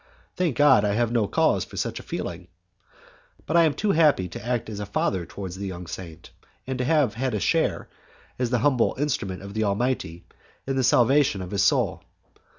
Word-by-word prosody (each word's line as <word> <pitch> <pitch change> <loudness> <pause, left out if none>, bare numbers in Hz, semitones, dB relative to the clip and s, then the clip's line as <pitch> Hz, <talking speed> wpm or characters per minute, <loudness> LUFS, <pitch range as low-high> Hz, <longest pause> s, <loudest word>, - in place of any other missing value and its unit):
Thank 175 -8 -1
God, 145 0 +6
I 105 -1 +1
have 115 +1 +1
no 115 -4 +1
cause - - +2
for - - -11
such - - -2
a - - -8
feeling! 85 +1 -6 1.0
I 170 +2 +4
am 155 - +2
but - - -20
too 210 -1 +1
happy 150 - +3
to 85 - -8
act 120 -1 -2
as 105 -2 -6
a 105 - -4
father 95 -3 -1
towards 95 -1 -7
a - - -10
young 90 -1 -7
saint, 85 -1 -9 0.3
and 130 -1 -4
to 125 - 0
have 145 -6 +2
had 125 0 -2
a - - -1
share, - - 0 0.5
as 125 -2 0
the 125 - +1
humble 130 -5 +2
instrument 100 -10 -2
of 100 0 -8
the 110 +1 0
Almighty, 100 -5 -2 0.4
in 135 - -2
the 130 - +1
salvation 125 -1 +3
of 90 - -8
his 100 -1 0
soul. 100 - +2
115 Hz, 205 wpm, -25 LUFS, 95-135 Hz, 1.0 s, God